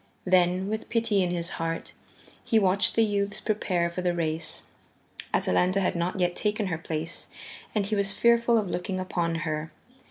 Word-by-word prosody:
Then, 180 0 +3
with 215 +1 -4
pity 225 -3 +2
in 180 - +1
his 170 -1 -1
heart, 165 0 -3 0.5
he 225 - +2
watched 200 -1 +3
the 225 - +5
youths 205 0 0
prepare 185 -6 0
for 180 - -4
the 175 -1 0
race. 160 -1 -2 0.7
Atalanta 185 +2 +2
had 190 - 0
not 175 +2 -1
yet 175 -1 +1
taken 210 0 0
her - - -1
place, 165 +1 -4 0.5
and 205 -2 +2
he 210 +2 -1
was 200 -1 +1
fearful 235 +1 +4
of 210 -3 0
looking 185 +1 -3
upon 175 -2 -1
her. 155 0 -3
185 Hz, 170 wpm, -27 LUFS, 170-210 Hz, 0.7 s, the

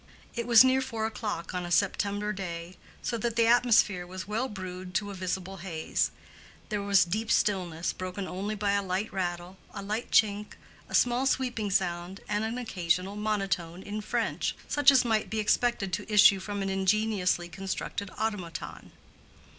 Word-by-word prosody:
It 235 0 -3
was 235 0 +9
near 260 0 +3
four 225 -4 -3
o'clock 210 -6 -4
on 180 -1 -2
a 175 - -5
September 205 +3 +1
day, 175 -2 -6 0.3
so 235 - -2
that 235 0 -1
the 230 0 +4
atmosphere 225 -6 +4
was 185 +1 -7
well 225 +5 -1
brewed 185 -2 -7
to 205 +2 0
a - - -6
visible 190 0 -4
haze. 170 -3 -1 0.6
There 210 -2 -1
was 200 -2 +4
deep 215 +6 -2
stillness, 180 -5 +1
broken 185 +1 -5
only 200 +4 -3
by 205 -1 0
a 200 0 +2
light 190 +2 -2
rattle, 180 0 -3 0.2
a - - -5
light 215 +4 -3
chink, 210 -1 +2 0.4
a - - -2
small 245 +2 +3
sweeping 245 -6 0
sound, 180 0 -1
and 210 +1 0
an 225 +2 -2
occasional 185 -4 -1
monotone 195 -5 -2
in 210 +1 -4
French, - - -1
such 290 -2 +5
as 265 -3 +5
might 220 -2 +1
be 220 - -3
expected 215 -2 +1
to 215 - -3
issue 205 -2 +7
from 200 +1 -4
an 195 - -2
ingeniously 195 -2 +1
constructed 195 +2 -4
automaton. 205 -6 -4
200 Hz, 170 wpm, -29 LUFS, 185-220 Hz, 0.6 s, was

